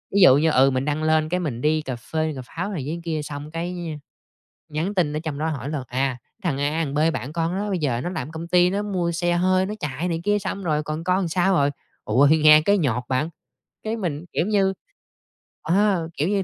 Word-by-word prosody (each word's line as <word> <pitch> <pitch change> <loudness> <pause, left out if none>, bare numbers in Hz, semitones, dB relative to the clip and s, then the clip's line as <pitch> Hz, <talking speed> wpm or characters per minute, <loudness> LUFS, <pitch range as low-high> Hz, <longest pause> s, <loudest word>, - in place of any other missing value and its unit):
ví 200 - +5
dụ 140 -6 +8
như, 160 +2 +3
ừ, 135 0 +5
mình 130 +2 -1
đăng 150 +1 -1
lên 155 0 +2
cái 180 +1 0
mình 135 -9 -3
đi 155 +2 +2
cà 130 -4 -4
phê 155 +6 -2
cà 130 - -5
pháo 180 +8 -4
này 160 -9 -3
với 170 +2 -3
kia 160 -3 -2
xong 145 +1 -7
cái, 170 +2 -4 0.2
a, - - -10 0.8
nhắn 175 +7 -1
tin 170 -6 +1
ở - - -1
trong 155 -3 -4
đó 160 +1 -1
hỏi 140 -3 -4
là, 140 -4 -3
à, 130 0 -1
"Cái - - -47
thằng 155 -6 0
A 145 +1 +1
thằng 140 - -5
B 145 - 0 0.2
bạn 130 +6 -4
con 165 +2 -1
đó 205 +1 -2
bây 185 - 0
giờ 130 -6 0
nó 175 - -3
làm 150 -7 -4
ở - - -10
công 165 +1 -6
ty 180 0 +4
nó 200 +2 -1
mua 180 -4 -1
xe 175 +1 0
hơi 185 +2 +2
nó 210 - -4
chạy 150 +4 -3
này 165 -1 -2
kia, 205 0 +2
xong 195 0 -4
rồi 155 -2 +1
còn 155 +2 -4
con 185 +1 +2
làm 180 -4 -1
sao 185 +3 +2
rồi?" 145 -3 +3 0.3
Ủa, 130 +7 +4
thì 160 +2 +5
nghe 155 0 +7
cái 200 +4 +3
nhột 125 -7 0
bạn, 135 +5 0 0.5
cái 220 +1 -2
mình, 170 -6 -3
kiểu - - +1
như, 195 -2 +2 0.9
ờ, 180 -1 +1
kiểu 150 +5 +1
như, 200 -2 +1
160 Hz, 260 wpm, -23 LUFS, 145-180 Hz, 0.9 s, dụ